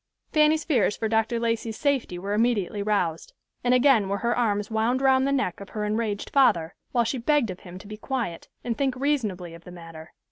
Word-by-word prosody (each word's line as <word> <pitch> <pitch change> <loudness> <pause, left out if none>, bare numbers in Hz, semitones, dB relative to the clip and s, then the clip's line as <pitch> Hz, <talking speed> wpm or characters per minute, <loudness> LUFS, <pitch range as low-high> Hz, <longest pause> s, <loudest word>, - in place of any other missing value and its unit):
Fanny's 305 +1 +4
fears 240 -9 +1
for 220 - -1
Dr. 225 +1 +1
Lacey's 230 -1 -2
safety 275 -10 0
were 200 +3 -3
immediately 210 -3 +1
roused; 195 -6 -1 0.3
and 245 - +2
again 250 -5 +4
were 200 - 0
her 235 +3 0
arms 210 -3 0
wound 225 +4 +1
round 265 0 +3
the - - +1
neck 265 -11 -1
of 200 - -10
her 210 -2 -3
enraged 210 -1 -2
father, 175 - +3 0.2
while 240 -2 +2
she 245 +3 -2
begged 245 -3 +2
of 180 - -9
him 180 -1 -11
to 195 - -12
be 210 +1 -8
quiet, 225 -8 -4 0.2
and 235 -1 -2
think 270 0 0
reasonably 220 - -1
of 170 0 -13
the - - -12
matter. 165 -2 -11
225 Hz, 210 wpm, -25 LUFS, 200-255 Hz, 0.3 s, Fanny's